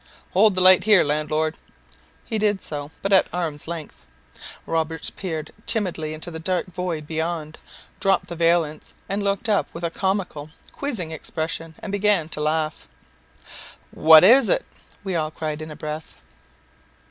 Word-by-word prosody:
"Hold 205 +1 +4
the 185 - +1
light 185 +1 +7
here, 210 -4 +6
landlord." 155 +2 -1 0.7
He 220 -2 -2
did 210 -2 +1
so, 145 -1 -5
but 195 0 +1
at 190 - +5
arm's 160 -5 -3
length. 160 - -7 0.6
Roberts 160 0 -1
peeped 160 -5 -5 0.2
timidly 165 -8 -1
into 160 +3 -6
the 160 - -6
dark 180 +1 -1
void 180 -4 -4
beyond, 160 0 -3 0.4
dropped 195 -1 +2
the 170 - -7
valance, 165 -2 0
and 200 +1 -2
looked 200 +2 -1
up 210 -2 +2
with 170 - -7
a 170 - -1
comical, 190 -6 -2 0.2
quizzing 225 - -3
expression, 160 +1 -5
and 205 - -4
began 200 -5 +2
to 150 - -4
laugh. 155 0 -1 1.0
"What 160 0 +7
is 250 +8 +7
it?" - - +1 0.4
we 190 -2 -3
all 155 -2 0
cried 155 -1 -4
in 155 - -7
a 150 - -8
breath. 155 +1 -6
165 Hz, 155 wpm, -23 LUFS, 155-195 Hz, 1.0 s, light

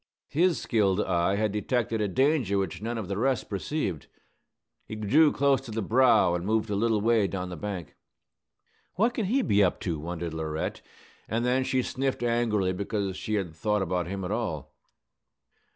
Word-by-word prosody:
His 170 +3 +2
skilled 100 -4 +1
eye 90 -1 +1
had 105 0 0
detected 110 +1 -1
a 105 - +1
danger 130 - +2
which 95 -2 -2
none 115 +2 -3
of 110 -5 -4
the 100 +1 -3
rest 130 -1 0
perceived. 100 - -3 0.8
He 110 - -6
drew 140 +9 +4
close 140 -1 +2
to 135 - -11
the 110 0 -2
brow, 120 -5 +4
and 85 -1 -2
moved 110 +2 0
a - - 0
little 110 0 +1
way 110 -2 +3
down 90 -1 -4
the 90 - -6
bank. 90 -3 -6 1.0
"What 230 +6 +2
can 225 -5 -1
he 260 +6 +2
be 100 - +3
up 90 - +1
to?" 85 -5 -2
wondered 85 +1 -5
Laurette; 80 -1 -3 0.5
and 115 +3 0
then 130 +1 +2
she 130 0 0
sniffed 135 -1 -2
angrily 115 -6 +1
because 100 0 -2
she 110 - -3
had 95 -6 -2
thought 105 +4 0
about 90 -2 -1
him 95 0 -4
at 90 - -4
all. 95 - -3
105 Hz, 185 wpm, -27 LUFS, 95-120 Hz, 1.0 s, drew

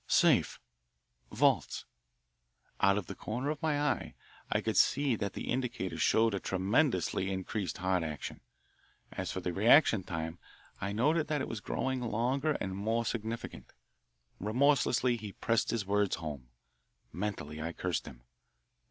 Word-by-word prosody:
"Safe." - - +4 0.7
"Vaults." - - +2 0.9
Out 100 +1 +4
of 105 - -2
the - - -6
corner 125 +7 -3
of 155 - -5
my 155 -3 +1
eye 145 0 -1 0.4
I - - +3
could - - -2
see 140 -3 +4
that 100 -2 -3
the - - -4
indicator 120 -7 -2
showed 115 -1 +3
a 100 - -1
tremendously 95 - +1
increased 95 -1 -3
heart 90 -1 +1
action. 75 -3 -5 0.7
As - - -4
for 95 - -4
the 90 -1 -2
reaction 110 - +5
time, 80 -1 -4 0.4
I 100 0 -2
noted 150 +9 +2
that 150 -1 0
it - - -2
was 115 - -4
growing 130 +4 -2
longer 125 +6 0
and 95 -8 -3
more 110 +4 0
significant. 115 0 -5 0.7
Remorselessly 125 +2 +2
he 105 -3 -7
pressed 115 -1 0
his 115 -4 -1
words 100 0 +1
home. 75 -6 -6 0.7
Mentally 85 -6 -4
I 80 +1 -3
cursed 90 +1 -2
him. - - -11
105 Hz, 145 wpm, -32 LUFS, 95-125 Hz, 0.9 s, reaction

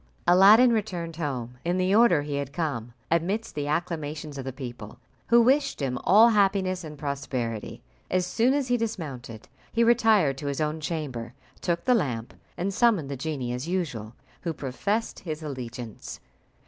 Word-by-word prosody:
Aladdin 205 +8 +7
returned 175 -7 -3
home 125 -6 -4
in 175 +2 0
the 185 +1 +2
order 210 -9 +5
he 145 -1 -3
had 140 -1 -4
come, 140 -9 -3 0.2
amidst 195 +7 0
the 145 -1 -3
acclamations 155 -2 -3
of 130 - -6
the 130 - -3
people, 120 -5 -8 0.3
who 235 +1 +6
wished 275 +4 +3
him 130 -3 -2
all 220 +5 +7
happiness 195 -3 +2
and 150 -2 -8
prosperity. 135 -6 -4 0.3
As 185 -1 +1
soon 235 +8 +2
as 275 -3 -1
he 245 - +3
dismounted, 140 - -5 0.2
he 230 - +2
retired 220 - +4
to 145 - -5
his 140 +1 -2
own 155 +1 -1
chamber, 140 -7 -4 0.3
took 170 -1 -1
the 255 - +5
lamp, 125 - -1 0.2
and 195 +3 -2
summoned 205 - +2
the - - -2
genie 135 -3 -3
as 125 +5 -4
usual, 130 - -3 0.3
who 165 - -2
professed 200 - -2
his 155 -3 -6
allegiance. 125 -5 -7
160 Hz, 165 wpm, -26 LUFS, 135-200 Hz, 0.3 s, Aladdin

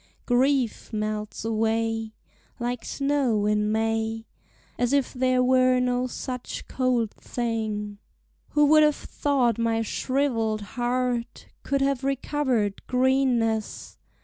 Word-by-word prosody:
Grief 255 -1 +1
melts 215 0 -3
away 225 0 -1 0.4
Like 245 0 -3
snow 275 -7 0
in 210 0 +1
May, 225 0 -1 0.5
As 245 +2 +1
if 280 -2 +1
there 255 0 +2
were 255 0 +4
no 250 0 0
such 250 0 -6
cold 250 -4 0
thing. 215 -3 -3 0.5
Who 295 0 +5
would 310 +1 +6
have 300 -1 +4
thought 255 -6 0
my 225 -1 +1
shrivelled 230 -3 -1
heart 245 -1 -2
Could 275 -1 -1
have 275 -1 0
recovered 265 -6 0
greenness? 250 -4 0
245 Hz, 110 wpm, -25 LUFS, 225-260 Hz, 0.5 s, would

